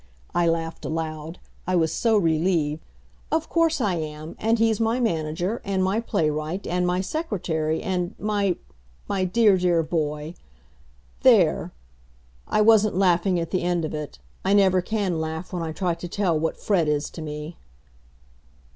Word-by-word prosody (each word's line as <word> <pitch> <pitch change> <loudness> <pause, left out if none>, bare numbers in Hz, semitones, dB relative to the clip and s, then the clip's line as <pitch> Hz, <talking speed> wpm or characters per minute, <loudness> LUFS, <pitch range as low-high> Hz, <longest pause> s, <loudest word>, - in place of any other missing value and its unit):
I 175 -1 +2
laughed 165 0 -2
aloud. 160 0 -4 0.3
I 185 - +1
was 160 -2 +2
so 225 -3 +2
relieved. 160 -3 +1 0.5
"Of 320 0 0
course 330 -2 +2
I 200 -7 +1
am, 155 0 -6
and 225 +2 +2
he's 225 -1 +2
my 225 +2 +1
manager, 175 0 -1
and 195 -1 0
my 190 +4 +1
playwright, 155 -3 -1
and 180 0 0
my 180 +1 +1
secretary, 175 - -2
and 180 -2 -2
my 205 -3 0 0.5
my 195 -2 0
dear, 205 +1 +4
dear 175 -2 +2
boy. 155 -1 -2 0.9
There!" - - +4 0.8
I 215 - +2
wasn't 215 -3 +5
laughing 180 -1 +3
at 165 -1 -4
the 185 - 0
end 175 -2 0
of - - -5
it. 150 -1 -5 0.3
I 195 - +2
never 190 -2 +4
can 190 -4 -1
laugh 160 +4 -5
when 175 - -2
I 165 -1 -3
try 175 +2 -1
to 170 +1 -7
tell 180 -2 0
what 160 +1 -1
Fred 180 -7 +1
is 150 0 0
to 165 - -8
me. 150 +2 -6
175 Hz, 160 wpm, -24 LUFS, 160-200 Hz, 0.9 s, wasn't